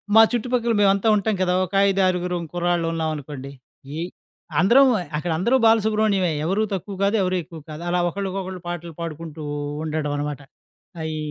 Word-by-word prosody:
మా 225 - +10
చుట్టుపక్కల 240 0 0
మేవంతా 200 +1 +3
ఉంటాం 210 +1 +1
కదా! 180 -1 +2
ఒక 185 - -15 0.2
ఐదారుగురు 180 -2 +1 0.2
కుర్రాళ్ళు 175 -1 0
ఉన్నామనుకోండి, 150 -4 -4 0.5
ఈ - - -3 0.6
అందరం 265 +8 +6 0.3
అక్కడ 170 +2 -2
అందరూ 235 +9 +2
బాలసుబ్రహ్మణ్యమే. 215 -5 +3
ఎవరు 195 +5 +1
తక్కువ 195 +1 -4
కాదు, 200 +3 +2
ఎవరు 185 0 0
ఎక్కువ 165 0 -11
కాదు. 155 +2 -7
అలా 180 0 +1
ఒకళ్ళకొకళ్ళు 190 -1 -4
పాటలు 170 -1 -5
పాడుకుంటూ, 160 -1 -6 0.4
ఉండడం 155 -2 -2
అనమాట 145 -1 -3 0.6
ఆహ్, 160 - -3
ఈ - - -3
180 Hz, 150 wpm, -23 LUFS, 160-200 Hz, 0.6 s, మా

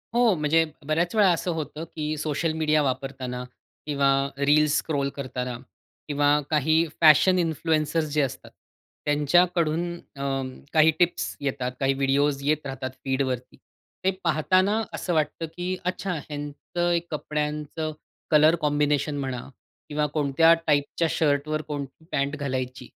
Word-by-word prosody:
हो, 240 -3 +5
म्हणजे 155 +2 +3 0.2
बऱ्याच 165 +5 0
वेळा 205 -3 +5
असं 175 +1 -2
होतं, 155 -1 -5
की 155 0 -2
सोशल 155 +2 -1
मीडिया 155 -1 +2
वापरताना 130 -2 -3 0.4
किंवा 140 -2 +2 0.3
रील्स 150 +1 +3
स्क्रॉल 140 -3 -1
करताना 125 -2 -4 0.5
किंवा 145 -1 +1 0.2
काही 160 +2 +3 0.2
फॅशन 160 +4 +6
इन्फ्लुअन्सर्स 160 -1 0
जे 150 - +3
असतात 135 -3 -4 0.5
त्यांच्याकडून 170 +3 +2
अ, 140 -5 -10 0.5
काही 160 0 +6
टिप्स 175 -1 +1
येतात. 130 -2 -2
काही 135 0 +2
व्हिडिओज 140 +1 +1
येत 155 0 +1
राहतात 135 -1 -4
फीड 135 0 0
वरती. 130 -2 -3 0.5
ते 190 - +4
पाहताना 185 +7 +2
असं 175 - -2
वाटतं 160 +1 0
की 180 +1 -2
अच्छा, 180 0 -2
ह्यांचं 150 +3 -3
एक 170 0 0
कपड्यांचं 150 +1 -3 0.4
कलर 155 +2 +6
कॉम्बिनेशन 145 0 +1
म्हणा 130 -3 -3 0.5
किंवा 150 0 0
कोणत्या 155 +2 +4
टाइपच्या 145 +2 +1
शर्टवर 155 0 +1
कोणती 145 0 -7
पॅन्ट 140 +2 0
घालायची 130 -2 -3
150 Hz, 130 wpm, -25 LUFS, 140-160 Hz, 0.5 s, फॅशन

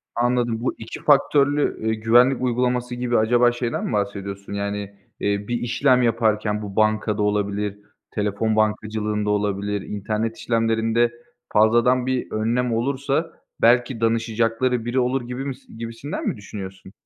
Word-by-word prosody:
Anladım. 120 -1 +1
Bu 130 - -1
2 110 - -9
faktörlü, 145 0 +3
eee, 110 - +2
güvenlik 120 +4 +4
uygulaması 125 0 0
gibi 120 -1 0
acaba 120 +2 +4
şeyden 120 -1 -3
mi - - -3
bahsediyorsun? 100 -1 -3
Yani, 100 0 -2 0.4
eee, 100 0 -1
bir 120 - -1
işlem 125 +2 +2
yaparken 110 -2 +1
bu 100 -2 -7
bankada 110 -1 +1
olabilir, 105 0 -1 0.3
telefon 105 +1 -1
bankacılığında 105 -1 0
olabilir, 105 0 -1
internet 110 +3 -3
işlemlerinde 115 0 +1 0.4
fazladan 120 +4 +4
bir 130 -1 -2
önlem 115 +2 0
olursa 140 +6 -1 0.3
belki 120 0 +3
danışacakları 115 +1 +1
biri 120 +2 0
olur 125 +2 +1
gibimis 130 +2 -6
gibisinden 115 +5 -5
mi - - -1
düşünüyorsun? 95 -2 -9
115 Hz, 130 wpm, -22 LUFS, 105-125 Hz, 0.4 s, güvenlik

